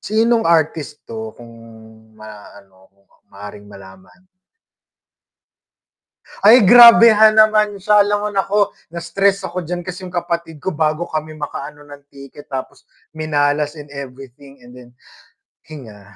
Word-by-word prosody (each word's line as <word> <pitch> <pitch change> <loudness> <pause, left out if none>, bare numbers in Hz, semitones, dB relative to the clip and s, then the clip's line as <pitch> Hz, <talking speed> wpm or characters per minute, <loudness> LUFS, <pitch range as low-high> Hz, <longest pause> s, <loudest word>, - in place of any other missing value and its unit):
Sinong 225 +2 0
artist 155 -2 -1
'to? 110 -1 -9
Kung 120 -1 -15 0.6
ma-ano 100 -3 -16 0.4
maaring 105 +1 -13
malaman. 95 - -17 2.2
Ay, 220 +2 +6
grabehan 230 -1 +7
naman 215 -1 +3
sya 205 +2 +2
'lam 205 +1 0
mo - - -2
naku, 200 +1 0 0.3
na-stress 195 +4 -2
ako 180 - -6
diyan 175 +1 -6
kasi 185 0 -8
yung 180 -1 -10
kapatid 170 -2 -5
ko 185 +6 -5
bago 155 +2 -2
kami 155 -1 -7
makaano 145 0 -8
ng 145 -1 -14
ticket 140 +1 -15
tapos 135 -2 -8 0.3
minalas 150 -1 -2
in 150 - -10
everything 135 0 -12
and 125 - -16
then 125 -1 -15 0.8
hinga. 105 -9 -14
155 Hz, 125 wpm, -17 LUFS, 125-195 Hz, 2.2 s, grabehan